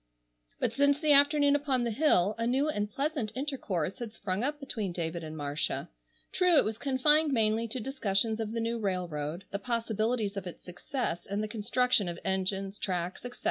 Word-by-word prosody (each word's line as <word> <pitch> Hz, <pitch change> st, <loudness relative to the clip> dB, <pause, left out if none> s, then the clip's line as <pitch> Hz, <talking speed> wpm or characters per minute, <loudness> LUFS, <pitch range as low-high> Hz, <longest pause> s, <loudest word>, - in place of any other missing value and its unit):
But -, -, 0 dB
since 285 Hz, 0 st, +3 dB
the 305 Hz, -2 st, +2 dB
afternoon 285 Hz, 0 st, +5 dB
upon 275 Hz, -4 st, +1 dB
the 235 Hz, -, -1 dB
hill 215 Hz, -, +3 dB
a 230 Hz, -, 0 dB
new 265 Hz, +4 st, +2 dB
and 210 Hz, -9 st, -1 dB
pleasant 275 Hz, -2 st, -2 dB
intercourse 235 Hz, -, -2 dB
had 235 Hz, -3 st, -5 dB
sprung 200 Hz, -1 st, -3 dB
up 295 Hz, +2 st, -1 dB
between 220 Hz, -9 st, -3 dB
David 170 Hz, -1 st, -3 dB
and 155 Hz, 0 st, -7 dB
Marcia. 145 Hz, 0 st, -2 dB, 0.4 s
True 360 Hz, -3 st, +4 dB
it -, -, +5 dB
was 220 Hz, +1 st, -3 dB
confined 295 Hz, +3 st, +3 dB
mainly 225 Hz, -2 st, +2 dB
to 240 Hz, +3 st, -3 dB
discussions 220 Hz, -3 st, 0 dB
of 220 Hz, -1 st, -3 dB
the 230 Hz, -, -2 dB
new 230 Hz, +1 st, -1 dB
railroad, 175 Hz, -4 st, -3 dB
the 200 Hz, -, -2 dB
possibilities 225 Hz, -1 st, -1 dB
of 195 Hz, -2 st, -4 dB
its 175 Hz, -, -9 dB
success, 180 Hz, 0 st, -4 dB
and 200 Hz, +2 st, -2 dB
the -, -, -2 dB
construction 225 Hz, 0 st, +1 dB
of 170 Hz, -, -5 dB
engines, 190 Hz, +1 st, -1 dB
tracks, 180 Hz, -1 st, -3 dB
etc. 245 Hz, 0 st, -8 dB
220 Hz, 185 wpm, -30 LUFS, 190-270 Hz, 0.4 s, afternoon